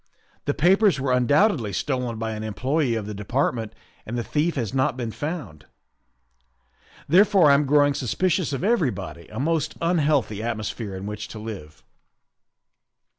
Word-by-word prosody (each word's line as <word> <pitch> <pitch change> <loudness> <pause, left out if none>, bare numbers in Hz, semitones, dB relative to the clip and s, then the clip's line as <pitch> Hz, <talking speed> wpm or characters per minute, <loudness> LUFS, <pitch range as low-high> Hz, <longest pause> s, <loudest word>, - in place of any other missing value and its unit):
The 145 - 0
papers 185 0 +4
were 135 -1 -1
undoubtedly 125 - +3
stolen 125 - -2
by 110 0 -3
an 110 0 -5
employe 130 +4 0
of 110 - -4
the 105 - -5
Department 110 +1 -1 0.3
and 120 +3 -5
the 120 - -1
thief 155 +7 0
has 115 -7 -3
not 130 0 +1
been 120 -3 -3
found, 145 - -6 1.4
therefore 185 -2 +5
I - - +7
am 140 0 +3
growing 145 0 +4
suspicious 175 - 0
of 135 +3 -3
everybody, 130 - -1
a 110 - -7
most 160 +2 0
unhealthy 150 - +1
atmosphere 110 -2 -4
in 95 +1 -6
which 105 0 -5
to - - -9
live. 105 -8 -8
130 Hz, 150 wpm, -24 LUFS, 110-155 Hz, 1.4 s, I